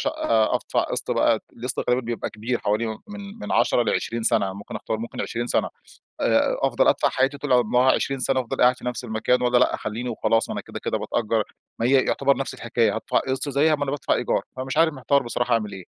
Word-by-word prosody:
شقة 110 Hz, -1 st, +1 dB
أدفع -, -, 0 dB
قسط -, -, -3 dB
بقى، -, -, +3 dB, 0.2 s
القسط -, -, -3 dB
تقريبًا 125 Hz, +1 st, +1 dB
بيبقى 120 Hz, 0 st, -4 dB
كبير 115 Hz, +3 st, -3 dB
حوالي 105 Hz, +3 st, 0 dB, 0.2 s
من 205 Hz, +1 st, -9 dB
من -, -, -4 dB
10 120 Hz, -, +3 dB
ل20 115 Hz, 0 st, -1 dB
سنة، 100 Hz, -4 st, +2 dB
ممكن 100 Hz, +1 st, -7 dB
أختار 110 Hz, -, -3 dB
ممكن 115 Hz, +1 st, -6 dB
20 120 Hz, +1 st, -3 dB
سنة، -, -, +1 dB, 0.5 s
آآ -, -, +2 dB
أفضل -, -, +2 dB
أدفع -, -, +3 dB
حياتي 135 Hz, +2 st, 0 dB
طول 145 Hz, -2 st, 0 dB
عمرها 125 Hz, +2 st, +4 dB
20 135 Hz, -1 st, -1 dB
سنة 130 Hz, +1 st, +1 dB
أفضل 115 Hz, -, -5 dB
قاعد 125 Hz, +1 st, +5 dB
في -, -, -12 dB
نفس 125 Hz, 0 st, -3 dB
المكان، 115 Hz, +2 st, 0 dB
والَّا 125 Hz, 0 st, +3 dB
لأ 125 Hz, -, +3 dB
أخليني 115 Hz, +3 st, -4 dB
وخلاص؟ 115 Hz, 0 st, +1 dB
أنا -, -, -3 dB
كده، -, -, -8 dB
كده -, -, -2 dB
باتأجر، 110 Hz, -1 st, 0 dB, 0.4 s
ما 115 Hz, -, 0 dB
هي 130 Hz, -, +2 dB
يعتبر 140 Hz, 0 st, +2 dB
نفس 135 Hz, -, -3 dB
الحكاية، 115 Hz, -2 st, 0 dB
هادفع 110 Hz, -, 0 dB
قسط، 135 Hz, +2 st, -2 dB
زيها 150 Hz, +3 st, +3 dB
ما 145 Hz, -, -3 dB
أنا 135 Hz, -, -2 dB
بادفع 145 Hz, -, 0 dB
إيجار، -, -, 0 dB, 0.2 s
فََمش 135 Hz, +3 st, -3 dB
عارف 160 Hz, -1 st, +4 dB
محتار 140 Hz, +1 st, +1 dB
بصراحة 120 Hz, +1 st, -1 dB
أعمل 110 Hz, -3 st, 0 dB
إيه؟ 95 Hz, -1 st, -8 dB
125 Hz, 220 wpm, -24 LUFS, 115-135 Hz, 0.5 s, قاعد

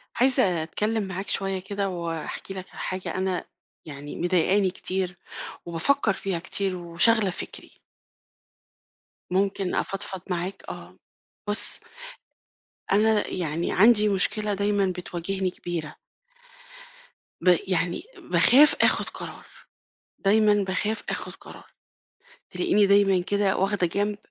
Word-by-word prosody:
عايزة 200 Hz, -10 st, +3 dB
أتكلِّم 210 Hz, +6 st, -1 dB
معاك 190 Hz, +1 st, -5 dB
شوية 195 Hz, -1 st, -1 dB
كده 200 Hz, +1 st, -3 dB
وأحكي 170 Hz, +1 st, -5 dB
لك 190 Hz, -1 st, -7 dB
على -, -, -12 dB
حاجة 185 Hz, 0 st, -4 dB
أنا 185 Hz, -1 st, -1 dB, 0.4 s
يعني 145 Hz, -1 st, -8 dB
مضايقاني 185 Hz, +2 st, +2 dB
كتير 185 Hz, -1 st, -3 dB, 0.5 s
وبافكّر 200 Hz, +7 st, +2 dB
فيها 190 Hz, -2 st, -3 dB
كتير 190 Hz, +1 st, -2 dB
وشاغلة 180 Hz, +5 st, +2 dB
فِكري. 180 Hz, -, -7 dB, 1.6 s
ممكن 195 Hz, 0 st, 0 dB
أفضفض 195 Hz, -1 st, -3 dB
معاك؟ 180 Hz, +2 st, -3 dB
آه. -, -, -10 dB, 0.5 s
بُص 210 Hz, -, +2 dB, 1.1 s
أنا 210 Hz, +1 st, +3 dB
يعني 170 Hz, -1 st, -2 dB
عندي 210 Hz, +1 st, +6 dB
مشكلة 205 Hz, +2 st, +2 dB
دايمًا 200 Hz, 0 st, +1 dB
بتواجهني 180 Hz, +1 st, -3 dB
كبيرة. 170 Hz, -4 st, -5 dB, 1.5 s
ب 180 Hz, 0 st, +5 dB
يعني 180 Hz, -2 st, 0 dB
باخاف 290 Hz, +5 st, +5 dB
آخُد -, -, +3 dB
قرار، -, -, -9 dB, 0.7 s
دايمًا 210 Hz, +1 st, +4 dB
باخاف 200 Hz, +3 st, -2 dB
آخُد -, -, -4 dB
قرار. -, -, -13 dB, 0.9 s
تلاقيني 275 Hz, -, +2 dB
دايمًا 200 Hz, -1 st, +4 dB
كده 200 Hz, +1 st, +1 dB
واخدة 195 Hz, -1 st, +1 dB
جنب 205 Hz, +4 st, -1 dB
190 Hz, 110 wpm, -25 LUFS, 180-205 Hz, 1.6 s, عندي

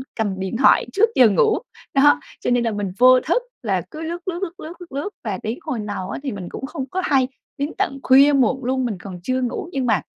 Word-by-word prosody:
cầm 200 Hz, -4 st, -2 dB
điện 190 Hz, +4 st, -3 dB
thoại 270 Hz, -, +5 dB
trước 445 Hz, +3 st, +4 dB
giờ 245 Hz, -3 st, +7 dB
ngủ. 435 Hz, -, +3 dB, 0.4 s
Đó, 285 Hz, +1 st, +5 dB, 0.2 s
cho -, -, -1 dB
nên 245 Hz, -1 st, +2 dB
là 230 Hz, -, 0 dB
mình 205 Hz, -2 st, -3 dB
vô 255 Hz, +1 st, +7 dB
thức 345 Hz, -, 0 dB, 0.2 s
là 195 Hz, -5 st, 0 dB
cứ 310 Hz, -, -8 dB
lướt, 340 Hz, +3 st, -5 dB
lướt, 350 Hz, -1 st, -2 dB
lướt, 345 Hz, -3 st, -4 dB
lướt, 315 Hz, +2 st, -7 dB
lướt, 345 Hz, -, -11 dB
lướt 285 Hz, +9 st, -3 dB
và 200 Hz, -5 st, -3 dB
đến 225 Hz, +7 st, -3 dB
hồi 300 Hz, -8 st, -4 dB
nào 205 Hz, -3 st, -4 dB
á, -, -, -4 dB
thì 270 Hz, -, -2 dB
mình 190 Hz, -4 st, -6 dB
cũng 270 Hz, -, -6 dB
không 285 Hz, -2 st, -5 dB
có 370 Hz, -, -1 dB
hay, 265 Hz, -2 st, +3 dB, 0.3 s
đến 285 Hz, +2 st, -2 dB
tận 275 Hz, -, -1 dB
khuya 275 Hz, +3 st, +6 dB
muộn 265 Hz, 0 st, +2 dB
luôn 260 Hz, 0 st, 0 dB
mình 220 Hz, -5 st, -3 dB
còn 185 Hz, -2 st, -8 dB
chưa 255 Hz, +4 st, -1 dB
ngủ, 250 Hz, +6 st, -3 dB
nhưng 270 Hz, -4 st, -1 dB
mà 215 Hz, -9 st, +2 dB
260 Hz, 255 wpm, -21 LUFS, 215-300 Hz, 0.4 s, giờ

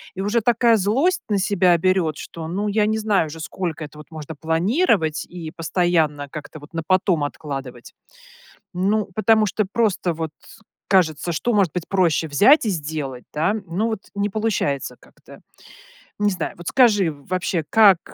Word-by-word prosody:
и 190 Hz, -, -4 dB
уже 210 Hz, +4 st, +1 dB
такая 235 Hz, +1 st, +3 dB
злость 260 Hz, -, +1 dB
на 205 Hz, -, +2 dB
себя 185 Hz, -3 st, +3 dB
берет, 170 Hz, -3 st, +1 dB
что, 165 Hz, -1 st, -8 dB
ну, 195 Hz, +5 st, -2 dB
я 210 Hz, 0 st, +1 dB
не 220 Hz, 0 st, 0 dB
знаю 210 Hz, -7 st, +1 dB
же, 160 Hz, +2 st, -9 dB
сколько 160 Hz, 0 st, -4 dB
это, 150 Hz, 0 st, -10 dB
вот, 150 Hz, -, -12 dB
можно 155 Hz, -1 st, -8 dB
планировать, 165 Hz, -, +1 dB
и 170 Hz, -3 st, -8 dB
постоянно 165 Hz, -4 st, 0 dB
как-то 155 Hz, +1 st, -9 dB
вот 145 Hz, +3 st, -15 dB
на 165 Hz, -, -2 dB
потом 185 Hz, -4 st, +2 dB
откладывать. 135 Hz, -4 st, -6 dB, 0.8 s
Ну, 200 Hz, +3 st, 0 dB
потому 220 Hz, +1 st, +3 dB
что 210 Hz, +1 st, -1 dB
просто, 200 Hz, -6 st, 0 dB
вот, 160 Hz, 0 st, -4 dB, 0.6 s
кажется, 170 Hz, -3 st, +2 dB
что 240 Hz, +9 st, -1 dB
может 195 Hz, -7 st, +2 dB
быть 180 Hz, -2 st, -4 dB
проще- 170 Hz, -5 st, +1 dB
взять 215 Hz, -, +5 dB
и -, -, +1 dB
сделать, 150 Hz, -6 st, -4 dB
да? 165 Hz, +7 st, +1 dB
Ну, 185 Hz, +7 st, -1 dB
вот, 220 Hz, -3 st, -3 dB
не 200 Hz, 0 st, 0 dB
получается 195 Hz, -10 st, -1 dB
как-то. -, -, -17 dB, 0.8 s
Не 205 Hz, 0 st, +3 dB
знаю, 185 Hz, -, -4 dB
вот, 175 Hz, -1 st, -10 dB
скажи, 205 Hz, -9 st, +4 dB
вообще 170 Hz, +3 st, -3 dB
как, 205 Hz, -6 st, +6 dB
180 Hz, 165 wpm, -22 LUFS, 155-210 Hz, 0.8 s, как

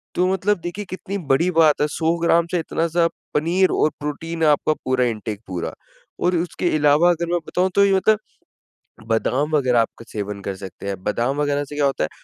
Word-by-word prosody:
तो 180 Hz, -, +2 dB
मतलब 190 Hz, +1 st, +1 dB
देखिए 175 Hz, +5 st, -5 dB
कितनी 190 Hz, +2 st, -5 dB
बड़ी 170 Hz, +7 st, +3 dB
बात 160 Hz, -4 st, +4 dB
है 150 Hz, -, +3 dB
100 165 Hz, +2 st, 0 dB
ग्राम 170 Hz, 0 st, +3 dB
से 180 Hz, -, +1 dB
इतना 165 Hz, 0 st, -1 dB
सा 170 Hz, +1 st, +3 dB, 0.3 s
पनीर 175 Hz, +5 st, +2 dB
और -, -, +2 dB
प्रोटीन 160 Hz, +3 st, -4 dB
आपका 150 Hz, 0 st, +3 dB
पूरा 130 Hz, -1 st, +2 dB
इंटेक 110 Hz, -3 st, -4 dB
पूरा। 90 Hz, -3 st, -4 dB, 0.5 s
और 180 Hz, 0 st, +3 dB
उसके 175 Hz, +1 st, -2 dB
इलावा 150 Hz, +3 st, +4 dB
अगर 170 Hz, 0 st, -2 dB
मैं 175 Hz, -, +2 dB
बताऊँ 185 Hz, +1 st, +1 dB
तो 200 Hz, -, +6 dB
ये 195 Hz, -, +3 dB
मतलब 210 Hz, +2 st, +3 dB, 0.9 s
बादाम 130 Hz, +6 st, 0 dB
वग़ैरह 130 Hz, -5 st, +3 dB
आपका 115 Hz, +1 st, -5 dB
सेवन 105 Hz, -1 st, -5 dB
कर 100 Hz, 0 st, -4 dB
सकते 95 Hz, +1 st, -9 dB
हैं। 95 Hz, -2 st, -4 dB
बादाम 120 Hz, +7 st, 0 dB
वग़ैरह 145 Hz, -1 st, 0 dB
से 145 Hz, -, -9 dB
क्या 145 Hz, -1 st, +1 dB
होता 135 Hz, -, 0 dB
है -, -, -7 dB
150 Hz, 200 wpm, -21 LUFS, 125-175 Hz, 0.9 s, तो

